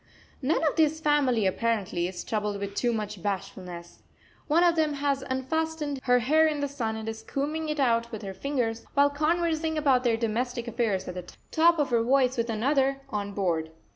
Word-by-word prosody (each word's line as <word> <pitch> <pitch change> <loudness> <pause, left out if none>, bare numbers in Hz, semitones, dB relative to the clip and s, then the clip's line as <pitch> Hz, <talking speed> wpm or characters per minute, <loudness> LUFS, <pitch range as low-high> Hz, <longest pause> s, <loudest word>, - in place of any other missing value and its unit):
None 295 +5 +1
of 300 - -1
this 315 0 +3
family, 285 -8 +2
apparently, 190 -4 0
is 180 -1 -6
troubled 210 -2 -2
with 200 0 -4
too 240 +4 +1
much 210 -4 -4
bashfulness. 185 -3 -5 0.5
One 325 +3 +4
of 345 -1 +4
them 310 -2 +1
has 280 -1 0
unfastened 290 +2 -2
her 250 -1 +5
hair 310 +7 +4
in 300 -2 -1
the 285 - 0
sun 240 -6 -3
and 220 0 -6
is 220 0 -5
combing 305 +6 -3
it 300 -1 -2
out 235 -3 +2
with 220 -2 -6
her 195 -1 -5
fingers, 235 -2 -2
while 285 0 +5
conversing 320 +1 0
about 270 -4 +3
their 235 -2 +2
domestic 235 +2 -2
affairs 220 -5 -1
at 180 - -4
the 180 -1 -8 0.2
top 335 +1 +4
of 290 -4 0
her 235 -1 +3
voice 255 +1 +3
with 235 0 -1
another, 270 +4 +1
on 205 -1 -3
board. 170 -5 -1
250 Hz, 195 wpm, -27 LUFS, 215-295 Hz, 0.5 s, her